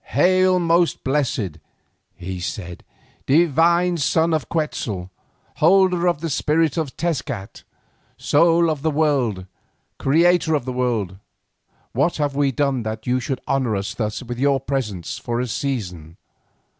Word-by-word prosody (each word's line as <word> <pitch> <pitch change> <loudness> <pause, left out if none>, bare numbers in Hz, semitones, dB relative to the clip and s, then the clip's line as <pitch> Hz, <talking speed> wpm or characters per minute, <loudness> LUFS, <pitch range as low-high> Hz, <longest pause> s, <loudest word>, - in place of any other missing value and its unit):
"Hail! 185 +4 +4
most 170 0 +1
blessed," 130 - -1 0.6
he 90 +1 -6
said, 90 0 -6 0.4
"divine 170 +3 +3
son 160 +2 +1
of 155 -6 -1
Quetzal, 110 - -3 0.5
holder 180 +1 +4
of 170 -4 0
the 165 - -2
spirit 155 +2 +1
of 155 -5 -3
Tezcat, 125 - -3 0.6
Soul 165 +2 +3
of 150 -3 -4
the 160 - +1
World, 140 -11 0 0.5
Creator 165 +2 +3
of 140 -5 -2
the 130 - -3
World. 115 -7 -1 0.7
What 140 +8 0
have 145 -2 -1
we 140 -1 +2
done 135 -1 0
that 110 0 -5
you 125 +1 +1
should 130 +1 -4
honour 130 -5 0
us 100 0 -3
thus 110 +1 -3
with 120 0 -6
your 140 0 +2
presence 120 - -4
for 120 -1 -3
a 125 - 0
season? 90 - -4
140 Hz, 140 wpm, -21 LUFS, 115-165 Hz, 0.7 s, Hail